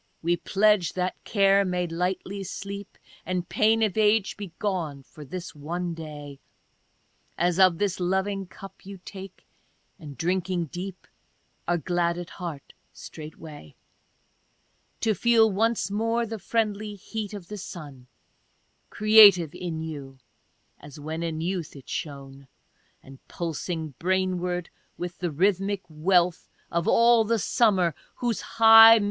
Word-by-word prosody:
we 170 +1 +2
pledge, 200 -1 +2
that 185 0 -2
care 200 -2 +3
may 180 -1 -1
lightly 180 +3 -3
sleepy 200 +1 -7 0.2
And 180 -1 -3
pain 225 +1 +2
of 210 -4 0
age 215 -1 +2
be 200 -4 -8
gone 165 -9 -3
for 150 +2 -13
this 175 +5 -7
one 170 +4 -4
day, 150 -3 -9 1.0
As 175 +1 +1
of 185 -3 +5
this 195 -1 -1
loving 190 +2 -1
cup 195 +4 -13
you 195 0 -9
take, 195 -1 -10 0.5
and, 145 -4 -10
drinking 180 0 -1
deep, 185 +1 -7 0.6
Are 175 - +2
glad 170 +1 0
at 175 -1 -7
heart 165 -6 -7 0.2
straightway 150 - -11 1.3
To 220 -2 +2
feel 225 +2 +4
once 225 +1 0
more 230 +3 0
the 225 -1 -6
friendly 210 0 -2
heat 210 +1 -6
of 190 -4 -9
the 210 - -7
sun 145 -9 -9 0.8
Creative 205 -7 +7
in 165 -3 -5
you, 140 -4 -7 0.6
(as 145 0 -12
when 160 +2 -5
in 160 -2 -3
youth 170 -3 -3
it 135 - -13
shone,') 140 -2 -7 0.6
And 135 0 -14
pulsing 165 -2 -4
brainward 180 -1 -1 0.3
with 175 0 -6
the 175 - -1
rhythmic 195 +4 0
wealth 175 +2 +1 0.2
Of 170 0 -1
all 235 -1 +5
the 230 +1 +1
summer 190 -6 +2 0.2
whose 235 -5 -2
high 225 0 +8
mi? - - +1
180 Hz, 135 wpm, -26 LUFS, 165-205 Hz, 1.3 s, high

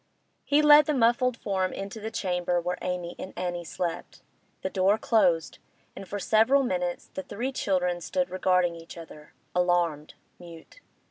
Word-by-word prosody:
He 290 +1 +3
led 300 0 +7
the 300 - +1
muffled 250 0 +2
form 190 -2 -1
into 195 +3 -6
the 220 +1 -5
chamber 180 -5 -1
where 180 +1 -3
Amy 180 -1 -4
and 185 - -7
Annie 175 -1 -3
slept. 170 0 -5 0.4
The 190 - -1
door 195 +3 +3
closed, 185 -8 +1 0.4
and 195 - -9
for 205 - -4
several 225 +7 +3
minutes 180 -6 -3
the - - -4
three 240 +7 -4
children 180 -7 -1
stood 270 +9 -2
regarding 180 -2 +2
each 165 +1 -11
other, 155 -2 -12 0.2
alarmed, 175 -4 0 0.2
mute. 170 - -13
185 Hz, 155 wpm, -27 LUFS, 175-220 Hz, 0.4 s, led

